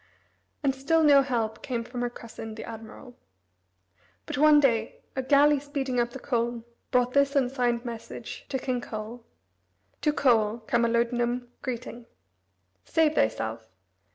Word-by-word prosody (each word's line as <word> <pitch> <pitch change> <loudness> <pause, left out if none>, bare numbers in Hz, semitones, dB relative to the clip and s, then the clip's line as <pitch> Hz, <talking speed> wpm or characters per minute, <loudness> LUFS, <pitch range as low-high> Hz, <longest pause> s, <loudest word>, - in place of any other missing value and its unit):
And 275 -2 +2
still 300 +5 +2
no 285 -2 +7
help 230 -5 -2
came 240 -3 -3
from 245 +1 -6
her 245 - 0
cousin, 225 -2 -9
the 220 - -7
admiral. 225 +2 -10 1.1
But - - -4
one 300 0 +7
day 230 -5 +1
a 265 - 0
galley 285 +2 +5
speeding 270 -3 -2
up 235 0 +1
the 240 - -8
Colne 240 -2 -1 0.3
brought 250 -1 +2
this 280 0 +3
unsigned 245 -3 +1
message 230 -1 -7
to 270 - -1
King 255 -1 -2
Coel: 225 +1 -7 0.8
"To 300 - +3
Coel, 230 -5 +2
Camalodunum, 240 0 +1
Greeting: 240 -1 -6 0.8
"Save 315 -2 +2
thyself. 110 - -1
245 Hz, 135 wpm, -27 LUFS, 230-275 Hz, 1.1 s, no